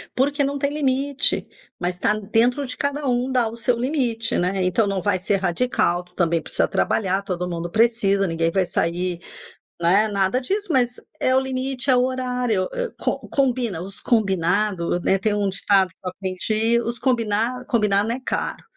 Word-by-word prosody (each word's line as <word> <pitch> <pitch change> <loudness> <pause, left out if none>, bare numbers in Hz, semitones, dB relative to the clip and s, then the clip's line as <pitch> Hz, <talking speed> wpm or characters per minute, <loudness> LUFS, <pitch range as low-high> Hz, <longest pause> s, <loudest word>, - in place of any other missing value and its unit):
Porque 285 +2 +1
não 280 +1 -1
tem 280 +1 0
limite, 280 0 0 0.3
mas 180 0 -2
tá 205 - +2
dentro 230 +6 +1
de 250 0 -6
cada 285 0 -2
um 250 +1 0
dar 245 -3 +2
o 230 - -9
seu 240 +1 +1
limite, 240 -4 -1
né. 185 +2 0
Então 185 +5 +2
não 195 -2 -1
vai 195 +1 +1
ser 195 +2 +1
radical, 180 -1 0
tu 180 0 -26
também 170 -2 +1
precisa - - 0
trabalhar, 195 -1 0
todo 180 -2 -3
mundo 170 0 -4
precisa, 215 -3 +2
ninguém 165 0 0
vai 190 +1 +1
sair, 175 +1 -1 0.6
né, 195 +6 +4
nada 200 +3 +1
disso, 395 +8 -2
mas 245 -3 +1 0.2
é 255 - +2
o - - +5
limite, 265 0 -3
é 255 - +6
o 250 - +3
horário, 250 -6 -1
eh, - - -2
com - - -1
combina, 245 - 0
os 195 +2 -6
combinados, 190 -4 +1
né, 195 - +3
tem 205 +2 0
um 205 -1 0
ditado 195 0 +2
que 185 - -25
eu - - 0
aprendi, 215 +5 0
os 235 +1 -3
combina 235 0 0
combinado 210 -3 +2
não 230 - 0
é - - -7
caro. - - -3
220 Hz, 185 wpm, -22 LUFS, 190-255 Hz, 0.6 s, é